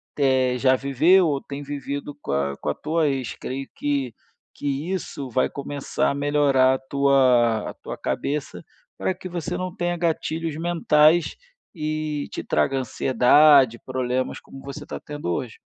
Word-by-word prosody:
te 130 -3 +2
já 130 +1 +4
viveu 160 +8 +4
ou 140 -3 -1
tem 140 +1 -7
vivido 145 0 -5
com - - -3
a 70 0 0
com - - -4
a 75 - +1
tua 160 0 0
ex. 135 -4 -2
Creio 135 +1 -5
que 140 -4 -2 0.4
que 145 +5 -3
isso 145 -7 -5
vai 130 +2 +1
começar 140 0 -2
a - - -2
melhorar 140 -2 +3
a - - -5
tua 130 -5 +3
a - - -13
tua - - -8
cabeça 145 0 -3 0.3
para 190 - -1
que 185 - -8
você 175 0 -4
não 185 0 -4
tenha 175 0 -1
gatilhos 165 -1 -2
mentais 165 -1 +3 0.4
e 155 -2 -3
te - - -5
traga 135 - +1
ansiedade, 130 +1 +4
problemas 130 0 -2
como 135 - -13
você 140 +2 -8
está - - -7
tendo 145 -10 -6
hoje. 115 +6 -3
140 Hz, 160 wpm, -23 LUFS, 130-155 Hz, 0.4 s, já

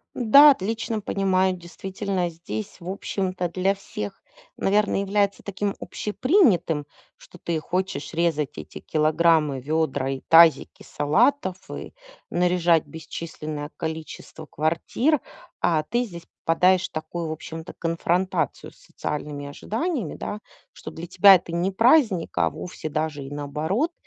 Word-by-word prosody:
Да, 280 +5 +8
отлично 225 -1 -1
понимаю. 190 -2 +1
Действительно 185 +1 -3
здесь 160 - -7
в 175 - -8
общем-то 185 -2 -2
для 185 +3 0
всех, 105 - -7 0.4
наверное, 205 0 +2
является 200 0 0
таким 200 0 -3
общепринятым, 210 - +1 0.3
что 180 - -16
ты 170 -1 -2
хочешь 180 -2 -3
резать 160 - -1
эти 75 - -9
килограммы, 155 -2 +2
вёдра 140 -2 -1
и 135 - -4
тазики 165 -3 +5
салатов, 190 - +1
и - - -7 0.4
наряжать 175 -2 +2
бесчисленное 155 -2 -7
количество 160 -1 -6
квартир, 170 - 0 0.4
а 160 -2 +2
ты 240 +10 -1
здесь 170 -6 -10 0.2
попадаешь 180 +3 +3
в - - -44
такую, 160 +1 -4
в - - -3
общем-то, 160 +1 -8
конфронтацию 170 +2 -1
с - - -24
социальными 145 - -5
ожиданиями, 225 - -3
да, 210 - -5 0.3
что 155 - -9
для 165 +2 -8
тебя 190 +2 +7
это 170 -1 -6
не 175 +3 0
праздник, 225 - +3
а 85 -2 +2
вовсе 175 - -7
даже 155 -1 -2
и 135 - -8
наоборот, 155 - -2
175 Hz, 130 wpm, -24 LUFS, 155-195 Hz, 0.4 s, Да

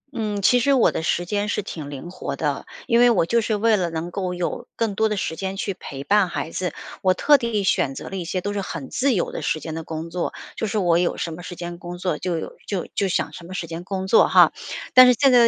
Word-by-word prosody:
嗯， 210 -3 -2
其 245 +4 +5
实 280 +4 +3
我 255 - +4
的 - - -3
时 175 +2 0
间 205 +2 -1
是 205 - -1
挺 155 -7 -7
灵 145 +5 -7
活 140 -6 -5
的， 145 -1 -2 0.2
因 235 0 +3
为 245 0 +7
我 195 -7 +3
就 235 +7 +2
是 215 -1 0
为 220 +1 +3
了 175 -2 0
能 165 +2 -4
够 185 -1 -3
有， 175 -1 -3
更 225 -3 0
多 220 +2 +2
的 210 - -1
时 160 - -2
间 195 +1 -4
去 195 - -2
陪 140 -6 -8
伴 200 +2 +3
孩 165 - -4
子， 180 -3 -2 0.3
我 185 -1 +3
特 290 -2 +5
地 225 -4 -1
选 135 -7 +1
择 - - -7
了 195 - -6
一 180 - -3
些 180 +2 -2
都 205 +2 -3
是 200 - -1
很 165 -7 -6
自 260 -3 +2
由 175 - -1
的 - - -5
时 155 - 0
间 160 0 -6
的 165 0 -5
工 160 +1 -6
作， 180 0 -2 0.2
就 220 - -2
是 215 - -2
我 175 -3 +3
有 175 - 0
什 165 - -3
么 175 - -8
时 175 0 -8
间 175 0 -6
工 175 0 -7
作 180 -4 -2
就 175 -2 -1
有 - - -6
就 195 -4 -2
就 200 - +1
想 185 - -1
什 170 - -10
么 185 - -7
时 170 - -3
间 165 +1 -6
工 190 0 -3
作 205 - +5
哈。 - - +6 0.4
但 255 0 +10
是 250 - +7
现 275 -2 +5
在 245 - +7
185 Hz, 300 characters per minute, -23 LUFS, 170-210 Hz, 0.4 s, 但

